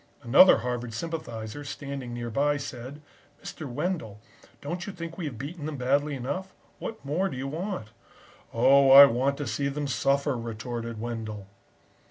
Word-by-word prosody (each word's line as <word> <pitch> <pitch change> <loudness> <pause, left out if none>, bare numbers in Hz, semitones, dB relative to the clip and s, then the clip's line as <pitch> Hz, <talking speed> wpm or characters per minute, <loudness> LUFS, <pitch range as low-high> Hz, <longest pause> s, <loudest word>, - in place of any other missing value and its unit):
"Another 135 +10 +7
Harvard 120 -2 -4
sympathiser, 120 -5 -5
standing 140 -3 -6
nearby, 120 +5 0
said: 140 +1 -8 0.4
"'Mr. 155 - -7
Wendell, 120 - -3 0.4
don't 170 +5 -5
you - - -4
think 170 -2 -7
we 175 - -5
have 135 -7 -5
beaten 150 +5 -6
them 155 -2 -5
badly 140 +3 +1
enough? 145 +10 -5 0.2
What 220 -9 -7
more 175 +8 0
do 130 - -6
you 135 +2 -3
want?' 165 - -4 0.6
"'Oh, 135 +4 +5
I 140 +1 +12
want 135 +2 +1
to 145 - -3
see 130 +5 -1
them 145 +1 -3
suffer,' 140 +1 +1
retorted 115 0 -5
Wendell." 110 -3 -5
140 Hz, 155 wpm, -27 LUFS, 120-150 Hz, 0.6 s, I